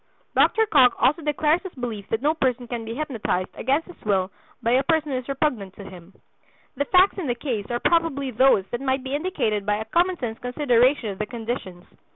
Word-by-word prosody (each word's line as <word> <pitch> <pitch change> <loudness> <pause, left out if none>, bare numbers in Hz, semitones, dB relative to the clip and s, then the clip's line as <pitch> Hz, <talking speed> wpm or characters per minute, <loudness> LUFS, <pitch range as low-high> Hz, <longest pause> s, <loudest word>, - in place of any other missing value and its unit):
Dr. 445 0 +4
Cocke 255 - +5
also 300 +6 +2
declares 300 +2 +1
his 380 -3 -9
belief 230 -6 -5
that 225 +3 -2
no 300 +2 +3
person 255 -5 -1
can 235 -1 -4
be 225 +1 -5
hypnotized 235 -10 -2
against 275 +6 0
his 355 - -15
will 190 -2 0 0.3
by 230 - +1
a 255 +2 +4
person 310 0 0
who 260 - 0
is 255 - -11
repugnant 255 -9 -1
to 200 - -10
him. 190 -1 -13 0.6
The 285 +2 -1
facts 370 +5 +4
in 335 - -3
the 245 - 0
case 235 -6 -3
are 240 0 -1
probably 310 -5 +1
those 250 -5 +4
that 240 - -3
might 265 -1 0
be 265 +1 -5
indicated 285 - -1
by 205 +1 +1
a 215 +1 -4
common 350 +10 +1
sense 230 -5 -5
consideration 250 -1 +2
of 195 - -7
the 210 - -2
conditions. 225 -7 -6
255 Hz, 210 wpm, -24 LUFS, 220-300 Hz, 0.6 s, Cocke